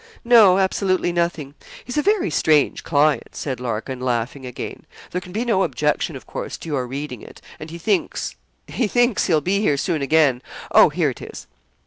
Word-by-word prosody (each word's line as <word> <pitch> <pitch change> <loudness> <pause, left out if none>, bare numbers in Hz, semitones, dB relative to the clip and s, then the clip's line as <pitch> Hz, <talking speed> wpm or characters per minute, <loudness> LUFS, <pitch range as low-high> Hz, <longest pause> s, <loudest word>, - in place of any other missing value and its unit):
'No; 220 -6 +7
absolutely 190 -2 +1
nothing 170 -5 -2 0.3
he's 245 - -6
a 300 - +2
very 400 +1 +1
strange 155 -2 +2
client!' 150 -1 +1
said 130 -4 -4
Larkin, 125 +1 -4
laughing 125 +1 -2
again. 125 - -8 0.2
'There 180 - -2
can 180 - -12
be 220 +6 -2
no 220 -5 +2
objection, - - 0
of - - -10
course, - - -6
to 165 - -9
your 130 -4 -2
reading 135 -2 -6
it; - - -13 0.2
and 155 - -8
he 170 - -8
thinks 190 +2 -1 0.3
he 240 - -1
thinks 245 0 +2
he'll 160 -4 +3
be 190 +6 0
here 150 -9 +1
soon 160 +1 -1
again 140 -3 +3 0.3
oh, - - +7
here - - 0
it - - -12
is.' - - -9
165 Hz, 185 wpm, -21 LUFS, 140-200 Hz, 0.3 s, No